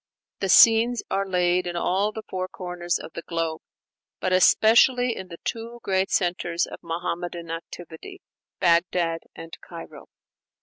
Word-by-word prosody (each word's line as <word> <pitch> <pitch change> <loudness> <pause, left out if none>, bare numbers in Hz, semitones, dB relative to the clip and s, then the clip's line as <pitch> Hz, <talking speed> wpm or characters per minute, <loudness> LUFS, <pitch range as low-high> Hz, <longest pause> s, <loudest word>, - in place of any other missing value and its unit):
The 195 - -2
scenes 230 +3 +6
are 195 0 0
laid 180 0 +1
in 175 - -4
all 190 +4 0
the 220 0 -7
four 185 -1 -3
corners 175 -2 -3
of 160 - -10
the - - -6
globe, 165 -1 -3 0.6
but 185 - -1
especially 235 +6 +4
in 190 - -7
the 170 -2 -10
two 230 +1 -5
great 190 0 0
centres 175 -1 0
of - - -10
Muhammadan 170 0 -4
activity, 170 - -9 0.4
Bagdad 170 -1 +2 0.2
and 165 0 -9
Cairo. - - -11
180 Hz, 140 wpm, -24 LUFS, 170-200 Hz, 0.6 s, scenes